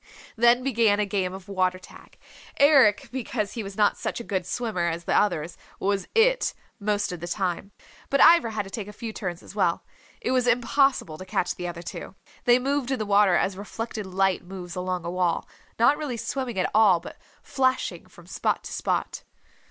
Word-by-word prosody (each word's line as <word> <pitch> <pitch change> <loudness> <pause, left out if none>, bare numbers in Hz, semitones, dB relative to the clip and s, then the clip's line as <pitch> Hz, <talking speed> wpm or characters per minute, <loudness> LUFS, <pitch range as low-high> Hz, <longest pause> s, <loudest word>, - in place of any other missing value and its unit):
Then 240 +2 +4
began 225 -5 +2
a 210 - +2
game 195 -2 -1
of 190 0 -10
water 185 -2 0
tag. 185 - -16 0.4
Eric, 270 -9 +5
because 230 -5 -3
he 230 - -4
was 195 -2 -8
not 210 -1 +3
such - - -3
a - - -6
good 190 -5 -3
swimmer 210 -6 -1
as 170 +1 -4
the - - -1
others, 175 -5 +1 0.2
was 195 -1 -1
It - - +3 0.2
most 205 -1 0
of 180 - -6
the 175 - -6
time. 185 +1 -2 0.4
But 275 - +1
Ivra 335 -9 +7
had 215 - -1
to 195 - -12
take 205 0 -5
a 210 - -9
few 225 0 -6
turns 180 -4 -5
as - - -12
well. - - 0 0.3
It 460 - -2
was 255 -1 +2
impossible 245 - +2
to 185 - -8
catch 180 - -1
the 180 - -5
other 170 0 -6
two. 175 +2 -8 0.3
They 245 0 +6
moved 270 0 -1
in 265 - 0
the 215 - -3
water 200 -2 +4
as 190 +2 +1
reflected 210 +1 -6
light 190 0 +1
moves 180 -1 -8
along 180 -1 -3
a 170 - -3
wall, 180 -2 0 0.3
not 280 +6 +4
really 275 -6 -3
swimming 255 -1 -4
at 185 - 0
all, 205 -5 +5
but 170 - -11 0.2
flashing 260 -1 -1
from - - -17
spot - - -1
to - - -7
spot. - - -2
205 Hz, 200 wpm, -25 LUFS, 185-240 Hz, 0.4 s, Ivra